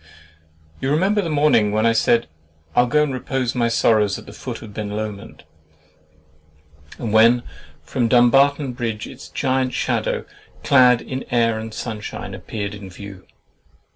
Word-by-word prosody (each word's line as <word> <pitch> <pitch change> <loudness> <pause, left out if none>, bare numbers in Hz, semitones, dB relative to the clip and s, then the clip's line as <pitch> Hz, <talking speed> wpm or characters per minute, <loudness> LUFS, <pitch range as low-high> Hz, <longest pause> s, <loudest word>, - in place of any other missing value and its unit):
You 135 - -2
remember 190 +8 +2
the 170 - -3
morning 145 -9 +3
when 110 +2 +1
I 115 - +5
said 115 +1 +2 0.5
"I - - +6
will 125 - +1
go 150 +4 +3
and 145 -3 -2
repose 130 -1 -2
my 120 -2 +1
sorrows 110 -3 +2
at - - -12
the 100 - -11
foot 120 +1 -7
of 105 -2 -11
Ben 105 -1 -4
Lomond"—and 105 -3 -6 1.7
when 115 +2 +5 0.4
from 120 -3 -1
Dumbarton 135 +3 +4
Bridge 115 -3 -4
its 130 - -11
giant 130 -1 -1
shadow, - - -1 0.4
clad 125 -3 +5
in 130 0 -5
air 115 -2 +1
and 110 0 -7
sunshine, 110 -1 -6
appeared 100 -2 -5
in 100 -2 -9
view. 95 0 -11
120 Hz, 150 wpm, -21 LUFS, 110-130 Hz, 1.7 s, I